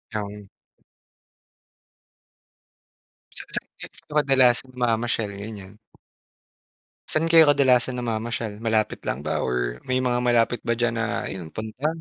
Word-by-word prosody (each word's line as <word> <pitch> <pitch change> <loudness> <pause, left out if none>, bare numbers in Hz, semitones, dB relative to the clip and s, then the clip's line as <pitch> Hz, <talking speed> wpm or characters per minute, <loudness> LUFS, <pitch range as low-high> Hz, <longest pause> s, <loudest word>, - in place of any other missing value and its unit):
Um. 105 -1 -5 2.9
Saan-saan - - -5
kayo 150 - -11
kadalasan 130 -3 +3
namamasyal, 115 -2 0
ganyan? 100 -3 -8 1.4
Saan 165 +1 0
kayo 160 -2 +8
kadalasan 130 -3 +4
namamasyal 115 -2 -3
malapit 110 -1 0
lang 70 +3 -2
ba 75 - -1
or - - -1
may 130 0 +1
mga 125 -1 +1
malapit 120 -1 +2
ba 115 - +2
diyan 120 0 0
na 115 +1 -1
ayun 90 -4 -6
punta? 110 +7 -3
115 Hz, 110 wpm, -24 LUFS, 110-125 Hz, 2.9 s, kayo